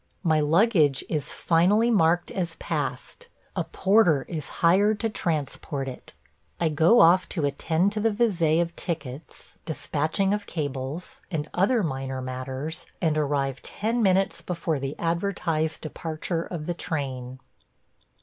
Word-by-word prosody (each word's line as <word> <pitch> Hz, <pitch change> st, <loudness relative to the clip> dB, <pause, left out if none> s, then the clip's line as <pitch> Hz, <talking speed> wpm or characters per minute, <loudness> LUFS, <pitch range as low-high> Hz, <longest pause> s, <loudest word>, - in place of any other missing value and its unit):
My 160 Hz, -3 st, +3 dB
luggage 155 Hz, -, +3 dB
is 150 Hz, -4 st, -1 dB
finally 200 Hz, +8 st, +3 dB
marked 175 Hz, -4 st, +3 dB
as 175 Hz, -3 st, -2 dB
passed; 480 Hz, -, -4 dB, 0.3 s
a -, -, 0 dB
porter 190 Hz, -8 st, +3 dB
is 155 Hz, -4 st, -4 dB, 0.2 s
hired 205 Hz, +5 st, +4 dB
to 225 Hz, -1 st, 0 dB
transport 145 Hz, -5 st, -2 dB
it; 130 Hz, -, -9 dB, 0.4 s
I 165 Hz, -, +2 dB
go 160 Hz, +10 st, +5 dB
off 180 Hz, +3 st, +5 dB
to 160 Hz, -6 st, -1 dB
attend 160 Hz, +6 st, +1 dB
to 215 Hz, -, -2 dB
the 225 Hz, +2 st, +3 dB
visé 185 Hz, -8 st, +2 dB
of 170 Hz, 0 st, -8 dB
tickets, 140 Hz, -4 st, -6 dB
despatching 160 Hz, +5 st, 0 dB
of 205 Hz, 0 st, -3 dB
cables, 145 Hz, +1 st, -4 dB
and 155 Hz, -4 st, -3 dB
other 210 Hz, +5 st, +2 dB
minor 135 Hz, -4 st, -3 dB
matters, 130 Hz, +4 st, -5 dB
and 160 Hz, -4 st, +1 dB
arrive 140 Hz, -3 st, 0 dB
ten 230 Hz, +3 st, -2 dB
minutes 195 Hz, -1 st, +2 dB
before 170 Hz, -4 st, -2 dB
the 135 Hz, +1 st, -4 dB
advertised 165 Hz, -2 st, -1 dB
departure 165 Hz, +2 st, -3 dB
of 160 Hz, -4 st, -6 dB
the 175 Hz, -, -1 dB
train. 130 Hz, -6 st, -4 dB
165 Hz, 140 wpm, -26 LUFS, 145-190 Hz, 0.4 s, go